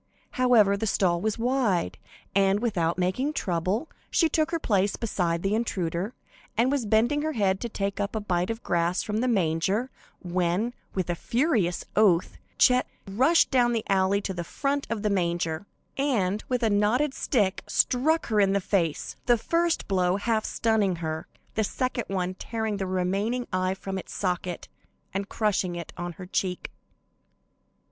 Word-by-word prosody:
However, 235 -6 +4
the 220 +2 -2
stall 175 -4 +2
was 215 +1 -1
wide, 225 - 0 0.3
and, 195 0 +3
without 175 -8 0
making 190 +12 0
trouble, 185 - -1 0.2
she 330 - +3
took 310 +1 +1
her 335 - 0
place 205 -9 +1
beside 175 -7 -1
the 195 +1 +1
intruder, 195 -2 -2 0.4
and 245 +4 +3
was 270 -6 0
bending 235 +8 +3
her 310 +1 -1
head 195 -4 +1
to 235 - -3
take 200 -2 -3
up 205 +2 -2
a - - +1
bite 180 -3 -1
of 225 +1 -4
grass 170 +1 +1
from 210 0 -2
the 250 +3 +1
manger, 195 +4 +1 0.3
when, 180 +6 0 0.2
with 185 -3 -1
a - - +1
furious 230 - 0
oath, 190 -5 +3 0.2
Chet 250 0 +4 0.2
rushed 260 - +3
down 245 -2 +3
the 225 -2 -1
alley 195 +1 +2
to 195 - -3
the 175 -1 -4
front 280 - -2
of 225 -2 -3
the 210 - +2
manger, 170 -1 -1 0.3
and, 215 -8 0
with 250 -1 0
a 225 - +3
knotted 230 +8 +2
stick, 205 -10 0
struck 310 +6 +2
her 215 -2 +1
in 195 -1 +4
the 200 - +2
face, 175 -5 -1
the 240 -1 +5
first 335 +8 0
blow 185 -2 +2
half 220 +2 0
stunning 215 -5 +1
her, 160 -1 -4 0.3
the 220 - +1
second 255 +3 -2
one 185 -1 -2
tearing 220 +1 -3
the 190 -1 -2
remaining 195 +7 -1
eye 185 0 +1
from 190 0 -5
its - - -10
socket, 180 -2 -2 0.5
and 195 +1 -3
crushing 200 -5 0
it 170 -2 -7
on 175 0 -5
her 180 +3 -9
cheek. 180 0 -2
200 Hz, 170 wpm, -26 LUFS, 180-235 Hz, 0.5 s, the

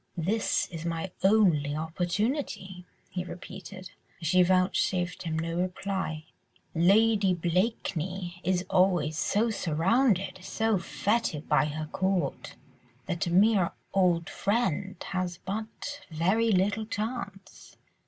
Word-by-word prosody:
"This 200 +7 +1
is 165 -2 -6
my 170 +2 -3
only 180 -8 +4
opportunity," 185 - -2 0.3
he 180 -1 -3
repeated, 185 +1 -9 0.3
as 165 - -4
she 185 +1 +5
vouchsafed 180 0 +1
him 160 -2 -2
no 165 +1 -2
reply, 185 -3 -2 0.5
"Lady 200 +2 +4
Blakeney 180 -1 -2
is 180 +1 0
always 180 -5 +2
so 225 +8 +1
surrounded, 195 - +1
so 220 +3 0
fêted 185 -3 -1
by - - +3
her 155 +1 -3
court, 185 +3 -2 0.5
that 175 -2 -2
a - - -1
mere 195 -1 +4 0.2
old 175 -3 +3
friend 200 -3 -1 0.2
has 185 -2 -2
but 220 +8 -5
very 190 +8 +2
little 205 +3 +1
chance." 210 -4 -6
185 Hz, 115 wpm, -28 LUFS, 170-205 Hz, 0.5 s, she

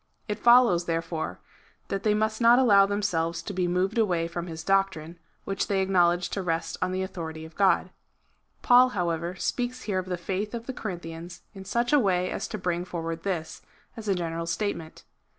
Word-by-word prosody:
It 210 -2 -3
follows, 235 -8 +5
therefore, 165 - -3 0.5
that 195 - -2
they 210 0 +2
must 220 +2 -1
not 235 +1 +7
allow 200 -6 +6
themselves 180 -5 -1
to 200 - -5
be 180 -1 0
moved 185 +5 0
away 175 -6 +1
from 170 +1 -5
his 160 -1 -7
doctrine, 190 -4 0 0.2
which 195 0 -2
they 195 -1 +1
acknowledge 175 -2 +2
to 200 - -3
rest 165 -2 -2
on 185 - 0
the 185 0 -1
authority 160 -4 -6
of 160 - -13
God. 195 -1 +2 0.7
Paul, 250 +1 +6
however, 170 0 -1
speaks 245 +6 -2
here 195 -3 -1
of 185 - -6
the 180 -1 -2
faith 195 +5 -3
of 230 0 -6
the 260 - -5
Corinthians 175 -5 -7
in 195 -2 -10
such 240 +6 0
a 295 - +7
way 185 -5 +1
as - - -3
to 215 - -5
bring 175 -2 -1
forward 165 -2 -5
this, 175 -5 -4 0.3
as 225 -2 -8
a 195 - +2
general 165 -1 -3
statement. 165 -3 -3
185 Hz, 190 wpm, -27 LUFS, 170-210 Hz, 0.7 s, not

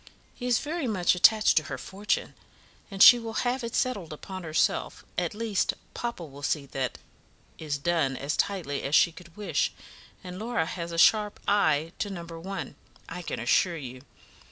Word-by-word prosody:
He 250 - -6
is 245 -2 +3
very 310 +1 -3
much 190 -6 +2
attached 215 +3 +5
to 155 - +3
her 130 - -5
fortune, 195 +9 -2 0.6
and 195 -1 +4
she 245 - +10
will 225 -1 -3
have 245 +1 0
it 230 - -4
settled 205 -11 -1
upon 185 +5 -7
herself; 160 -2 -1
at - - -2
least, 215 -3 0 0.2
papa 235 -8 -4
will 140 -1 -12
see 145 0 -1
that 135 -2 -3 0.6
is 150 -2 -2
done 145 -3 0
as 140 +2 -2
tightly 175 -9 -1
as 140 +3 0
she 170 - +5
could 170 +1 -15
wish, 210 - 0 0.5
and 180 0 -7
Laura 225 -6 -1
has 170 0 -5
a 165 - -5
sharp 210 +4 +4
eye 160 -6 +2
to 205 - -1
number 170 -3 -7
one, 185 -3 -6 0.3
I 180 +2 -6
can 170 - -5
assure 170 +8 +2
you. 130 -3 -8
180 Hz, 180 wpm, -27 LUFS, 155-210 Hz, 0.6 s, she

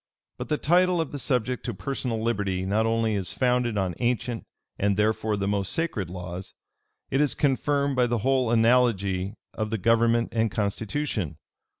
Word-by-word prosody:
But - - -5
the 150 - +1
title 180 +3 +3
of 160 -4 -2
the 145 - -5
subject 125 -2 0
to 120 - -3
personal 125 0 -3
liberty 100 -5 -1
not 105 +3 +1
only 115 -1 +1
is 95 -3 -1
founded 125 -3 +1
on 95 -2 0
ancient, 120 -1 -1 0.3
and, 100 0 +1
therefore, 110 0 +1
the 100 0 -1
most 100 -1 0
sacred 160 - -2
laws; 90 0 -7 0.6
it 135 - +2
is 150 - +2
confirmed 140 0 +1
by 125 -1 +3
the 120 0 0
whole 130 -3 +2
analogy 115 -5 +2 0.2
of 110 -1 -3
the 110 - -1
government 115 +3 +3
and 115 -1 +1
constitution. 105 - -2
115 Hz, 170 wpm, -26 LUFS, 100-125 Hz, 0.6 s, title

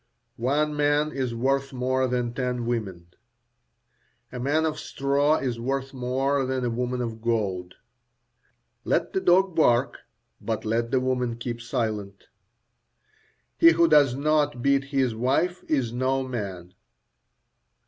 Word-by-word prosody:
One 150 +5 0
man 150 +1 +2
is 130 -4 -3
worth 135 +3 0
more 130 +1 0
than 120 -1 -1
ten 125 -2 -2
women. 100 -8 -4 1.2
A 125 - -6
man 145 +5 +1
of 155 -1 -2
straw 140 +2 +1
is 125 -3 -3
worth 135 +2 -3
more 135 +2 0
than 130 -1 -2
a 120 - 0
woman 125 +1 -2
of 115 -2 -5
gold. 100 -6 -2 1.1
Let - - 0
the 380 - 0
dog 185 - +3
bark, 125 -4 +2 0.4
but - - -3
let 115 +2 0
the 130 - +2
woman 125 -2 -1
keep 120 0 -5
silent. 110 -5 -3 1.4
He 165 0 +8
who 170 +1 +4
does 145 -5 +5
not 145 -2 +1
beat 140 0 +2
his 135 -4 0
wife 135 +10 0
is 130 -6 0
no 130 +1 0
man. 95 -7 -6
130 Hz, 135 wpm, -25 LUFS, 120-140 Hz, 1.4 s, He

